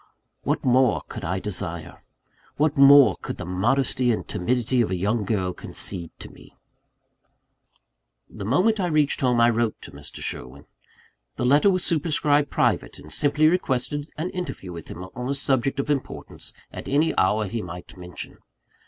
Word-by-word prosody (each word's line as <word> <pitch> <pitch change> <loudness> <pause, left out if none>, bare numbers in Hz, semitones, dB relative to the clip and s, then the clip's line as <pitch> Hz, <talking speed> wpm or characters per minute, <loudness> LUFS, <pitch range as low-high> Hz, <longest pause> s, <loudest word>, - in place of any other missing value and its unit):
What - - -1
more 130 -2 +3
could 110 - -7
I 90 +2 -1
desire? 90 -5 -5 0.6
What 150 +1 +2
more 140 0 +7
could - - -6
the - - -6
modesty 120 +7 +1
and 110 - -2
timidity 125 +6 0
of 115 - 0
a 95 - -1
young 105 +5 0
girl 95 -4 -1
concede 85 -2 -4
to - - -9
me? - - -17 1.7
The - - -9
moment 185 - +2
I 180 - +1
reached 155 -3 +2
home, 125 -2 +2
I 120 0 +5
wrote 115 -1 -1
to - - -10
Mr. - - -10
Sherwin. 65 +1 -5 0.7
The - - -2
letter 145 +9 +5
was 185 -2 +1
superscribed 150 -2 +2
"Private;" - - 0
and 75 - -10
simply 150 +2 +3
requested 145 -3 0
an 170 +4 -3
interview 180 - -5
with 85 -2 -9
him 90 - -8
on 125 +2 -5
a 140 - 0
subject 135 0 +1
of 145 +2 -1
importance, 140 -3 -4 0.2
at - - -8
any 150 +4 +2
hour 105 +3 +2
he 115 +3 -3
might 90 -1 -9
mention. 90 -1 -8
125 Hz, 165 wpm, -24 LUFS, 100-145 Hz, 1.7 s, more